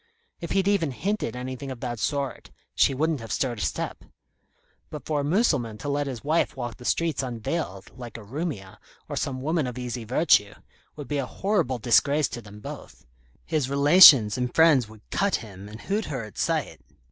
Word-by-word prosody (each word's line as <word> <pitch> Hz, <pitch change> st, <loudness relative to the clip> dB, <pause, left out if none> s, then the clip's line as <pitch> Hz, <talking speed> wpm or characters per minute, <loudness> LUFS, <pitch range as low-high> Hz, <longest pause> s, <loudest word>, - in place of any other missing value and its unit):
If 170 Hz, -, -5 dB
he'd 195 Hz, 0 st, +1 dB
even 200 Hz, -7 st, +2 dB
hinted 190 Hz, -, -3 dB
anything 130 Hz, +2 st, -6 dB
of 130 Hz, -2 st, -7 dB
that 120 Hz, -3 st, -4 dB
sort 140 Hz, 0 st, -3 dB, 0.2 s
she 135 Hz, -, +3 dB
wouldn't 155 Hz, +1 st, 0 dB
have 115 Hz, -2 st, -8 dB
stirred 120 Hz, +2 st, -1 dB
a -, -, -4 dB
step. -, -, -3 dB, 0.9 s
But 150 Hz, -, -8 dB
for 150 Hz, -2 st, -1 dB
a -, -, -3 dB
Mussulman 140 Hz, -, +1 dB
to 145 Hz, -, -5 dB
let 145 Hz, 0 st, -1 dB
his 125 Hz, -4 st, -6 dB
wife 155 Hz, +3 st, +1 dB
walk 120 Hz, -3 st, -5 dB
the 125 Hz, -, -12 dB
streets 165 Hz, -1 st, 0 dB
unveiled, 120 Hz, -, -4 dB
like 120 Hz, -3 st, -9 dB
a 115 Hz, -, -10 dB
Roumia, 120 Hz, -, -5 dB, 0.3 s
or -, -, -5 dB
some 130 Hz, -1 st, -3 dB
woman 155 Hz, -2 st, 0 dB
of 125 Hz, 0 st, -6 dB
easy 125 Hz, -1 st, -4 dB
virtue, 110 Hz, -4 st, +2 dB, 0.4 s
would 145 Hz, -2 st, -8 dB
be 145 Hz, -1 st, -1 dB
a 130 Hz, -, -2 dB
horrible 180 Hz, -10 st, -1 dB
disgrace 140 Hz, +5 st, +3 dB
to 120 Hz, -, -7 dB
them 105 Hz, -1 st, -13 dB
both. -, -, -10 dB, 0.4 s
His 155 Hz, -6 st, -1 dB
relations 140 Hz, -, +7 dB
and 125 Hz, -1 st, -1 dB
friends 150 Hz, -9 st, +5 dB
would 110 Hz, -1 st, -16 dB
cut 200 Hz, 0 st, +1 dB
him, 100 Hz, -2 st, -8 dB
and 110 Hz, +2 st, -10 dB
hoot 210 Hz, +2 st, -2 dB
her 135 Hz, -6 st, -4 dB
at 110 Hz, -3 st, -11 dB
sight. -, -, -1 dB
130 Hz, 195 wpm, -25 LUFS, 115-155 Hz, 0.9 s, relations